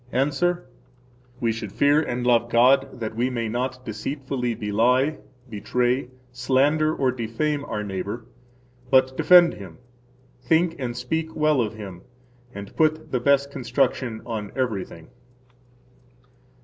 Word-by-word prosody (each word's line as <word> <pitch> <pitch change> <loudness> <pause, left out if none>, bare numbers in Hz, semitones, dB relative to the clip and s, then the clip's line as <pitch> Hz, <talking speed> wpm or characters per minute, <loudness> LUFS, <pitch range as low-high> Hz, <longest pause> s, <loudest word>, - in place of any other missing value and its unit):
–Answer: 150 +7 0 0.7
We 115 -2 +1
should 110 -3 -6
fear 145 +8 +3
and 120 -5 -3
love 120 -1 +3
God 130 +2 +3
that 110 -1 -4
we 120 +3 0
may 120 -3 -2
not 125 +3 -3
deceitfully 125 +2 -3
belie, 125 +9 +1 0.3
betray, 125 +4 -1 0.2
slander, 135 +5 +2
or 130 -2 +1
defame 130 +5 -2
our 105 -6 -4
neighbor, 100 +3 -5 0.6
but 130 0 +4
defend 175 +1 +6
him, 95 -5 -11 0.6
[think 165 +4 +2
and] 120 -2 -4
speak 160 +6 -3
well 150 -3 +2
of 110 -1 -3
him, 95 -5 -9 0.5
and 100 -3 -9
put 155 0 +1
the 125 - +1
best 140 +2 +2
construction 125 -2 -1
on 110 -4 -5
everything. 100 -10 -4
125 Hz, 125 wpm, -24 LUFS, 115-140 Hz, 0.7 s, defend